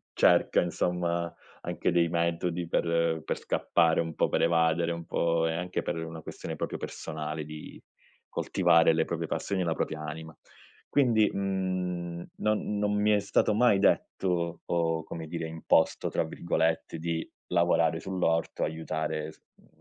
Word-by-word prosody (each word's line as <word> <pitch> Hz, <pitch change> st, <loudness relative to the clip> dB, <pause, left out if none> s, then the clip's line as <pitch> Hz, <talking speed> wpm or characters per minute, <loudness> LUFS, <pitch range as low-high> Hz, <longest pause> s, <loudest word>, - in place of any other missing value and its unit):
cerca, -, -, +4 dB
insomma, 85 Hz, -1 st, -1 dB, 0.3 s
anche -, -, -1 dB
dei 85 Hz, -1 st, +3 dB
metodi 85 Hz, +1 st, -1 dB
per 85 Hz, -1 st, +1 dB
per -, -, -3 dB
scappare 85 Hz, -1 st, +2 dB
un 80 Hz, -1 st, -3 dB
po', -, -, +2 dB
per -, -, +1 dB
evadere 85 Hz, 0 st, +2 dB
un 85 Hz, 0 st, -6 dB
po', 85 Hz, 0 st, +1 dB
e 80 Hz, -, 0 dB
anche 90 Hz, +2 st, -2 dB
per 85 Hz, -, -2 dB
una 80 Hz, 0 st, -7 dB
questione -, -, -6 dB
proprio -, -, -3 dB
personale 75 Hz, -1 st, -5 dB
di 75 Hz, 0 st, -9 dB, 0.5 s
coltivare 80 Hz, 0 st, +3 dB
le 80 Hz, 0 st, +2 dB
proprie 85 Hz, -1 st, -3 dB
passioni 100 Hz, +3 st, -2 dB
e 90 Hz, -, +1 dB
la 80 Hz, -1 st, 0 dB
propria 80 Hz, -1 st, -3 dB
anima. 80 Hz, +1 st, -7 dB, 0.5 s
Quindi, 115 Hz, -6 st, +3 dB
mhmm, 90 Hz, -3 st, -2 dB
non 105 Hz, -1 st, 0 dB
non 105 Hz, 0 st, +1 dB
mi 105 Hz, +1 st, +2 dB
è 105 Hz, -, +4 dB
stato 100 Hz, +1 st, +2 dB
mai 115 Hz, -3 st, +4 dB
detto, 90 Hz, -3 st, +1 dB
o 80 Hz, -1 st, 0 dB
come 80 Hz, 0 st, -7 dB
dire 85 Hz, 0 st, -4 dB
"imposto", 80 Hz, 0 st, +1 dB
tra -, -, +1 dB
virgolette 80 Hz, 0 st, -1 dB
di 80 Hz, 0 st, -2 dB, 0.2 s
lavorare -, -, +2 dB
sull'orto, 85 Hz, -3 st, -1 dB
aiutare 80 Hz, 0 st, -3 dB
s -, -, -24 dB
mhmm, -, -, -26 dB
85 Hz, 155 wpm, -29 LUFS, 80-90 Hz, 0.5 s, cerca